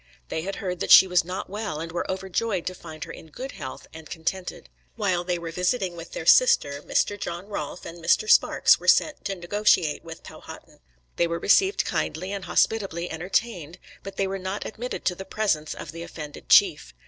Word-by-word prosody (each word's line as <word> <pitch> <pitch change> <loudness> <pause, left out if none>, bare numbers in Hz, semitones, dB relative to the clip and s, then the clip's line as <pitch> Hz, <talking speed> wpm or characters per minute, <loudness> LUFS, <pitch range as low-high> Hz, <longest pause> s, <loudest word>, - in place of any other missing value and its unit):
They 160 - -2
had 195 +4 -4
heard 180 -2 -4
that - - -3
she - - +10
was 180 -1 +2
not 180 +2 -5
well, 205 -6 -4
and 165 +1 -5
were 175 - -3
overjoyed 190 +1 -2
to 185 - -3
find 160 -3 -9
her 165 - -8
in - - -11
good 260 - -7
health 130 - -8
and 160 -1 -11
contented. 180 +2 -4 0.3
While 185 -5 0
they 180 0 -1
were 170 -1 -6
visiting 180 +1 -1
with 165 0 -10
their 160 - -5
sister, 145 - +5
Mr. 205 +6 0
John 175 +1 -5
Rolfe 200 -3 -6
and 170 0 -9
Mr. 435 - +3
Sparks 470 - +5
were - - -10
sent 305 - +3
to 195 - -2
negotiate 175 -3 +1
with 165 0 -10
Powhatan. - - -12 0.4
They 170 - +2
were 170 0 -2
received 385 - +3
kindly 185 +4 -2
and 200 -2 -5
hospitably 190 -6 0
entertained, 175 -1 -2 0.2
but 195 - -9
they 195 - 0
were 195 0 -3
not 190 +2 -4
admitted 245 +3 -6
to 180 - +2
the 190 - -8
presence 190 -8 -1
of 150 - -8
the 165 +1 -8
offended 150 -3 -9
chief. 60 -1 +4
180 Hz, 200 wpm, -25 LUFS, 165-200 Hz, 0.4 s, she